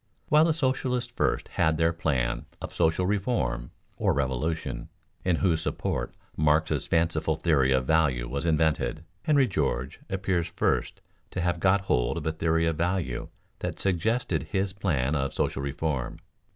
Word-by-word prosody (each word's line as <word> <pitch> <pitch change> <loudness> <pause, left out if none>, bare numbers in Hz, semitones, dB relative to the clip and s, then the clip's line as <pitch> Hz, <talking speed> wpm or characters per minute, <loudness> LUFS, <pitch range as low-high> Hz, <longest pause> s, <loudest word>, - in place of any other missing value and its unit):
While 155 +1 +6
the 165 - +3
socialists 130 -4 -1
first - - 0
had 80 0 +1
their 85 +1 +2
plan - - -1
of - - -7
social 85 +2 +2
reform 95 - 0 0.3
(or - - +2
revolution), 65 -1 -2 0.3
in 90 -2 +2
whose 80 -2 +2
support - - -2 0.2
Marx's 75 +1 +2
fanciful 80 -1 +1
theory 75 -5 +2
of 65 -1 +2
value 70 -6 +2
was 70 +7 -2
invented, 80 0 +1 0.2
Henry 145 -2 +3
George 70 - -1
appears 95 -3 0
first - - -1 0.3
to 90 - -3
have 90 -1 0
got 95 +3 +3
hold 60 -11 +1
of - - -5
a 80 - +1
theory 80 +1 +1
of 80 -2 0
value 85 -7 -1 0.3
that - - -4
suggested 95 - 0
his 95 0 0
plan 75 -9 0
of 70 -2 -1
social 65 - 0
reform. 70 0 -2
80 Hz, 150 wpm, -27 LUFS, 70-95 Hz, 0.3 s, While